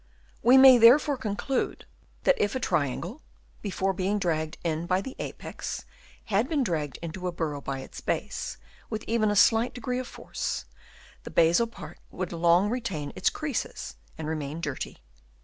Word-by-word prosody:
We 250 +3 +7
may 260 -2 +9
therefore 275 +6 +7
conclude 250 +2 -2 0.4
that 275 - +3
if 205 +3 +1
a - - 0
triangle, 165 - -1 0.4
before 195 -1 -1
being 190 +3 0
dragged 160 -4 -1
in 165 0 -1
by 185 +1 +2
the 260 +7 -6
apex, - - -6 0.4
had 220 +5 +1
been 300 -4 +1
dragged 155 - -2
into 180 +2 -4
a - - -1
burrow 155 -4 -3
by 135 -1 -4
its - - -10
base - - -3 0.3
with 215 0 -4
even 225 -2 +2
a 205 - +1
slight 225 +4 +4
degree 250 +1 -2
of 255 - -5
force, - - -4 0.6
the - - -8
basal 170 +8 +4
part 175 -8 -11
would 180 -1 -4
long 170 +3 +4
retain 210 - -3
its - - +2
creases - - -4 0.2
and 160 - -5
remain 155 0 -3
dirty. 145 -5 -4
190 Hz, 165 wpm, -27 LUFS, 160-235 Hz, 0.6 s, may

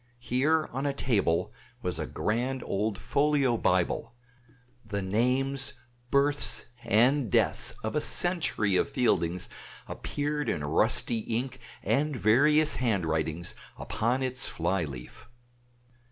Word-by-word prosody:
Here 140 +6 0
on 135 +3 -2
a 140 - -1
table 100 -12 0 0.3
was - - -2
a - - -3
grand 125 +4 -2
old 105 +1 -2
folio 140 -2 +1
Bible; 95 +2 0 0.7
the 100 -3 -4
names, 130 +7 +1 0.4
births, 140 +2 +3 0.2
and 125 +4 +2
deaths - - +3
of 110 - -3
a 150 - +1
century 160 - +2
of - - 0
Fieldings 90 -8 0 0.4
appeared 145 0 -3
in 75 - -2
rusty 110 +9 +1
ink 120 +4 -4 0.2
and 150 +1 0
various 145 - +3
handwritings 85 - -1 0.2
upon 120 +5 -1
its 130 0 +2
fly 85 +1 -1
leaf. 65 - -10
120 Hz, 115 wpm, -28 LUFS, 100-140 Hz, 0.7 s, births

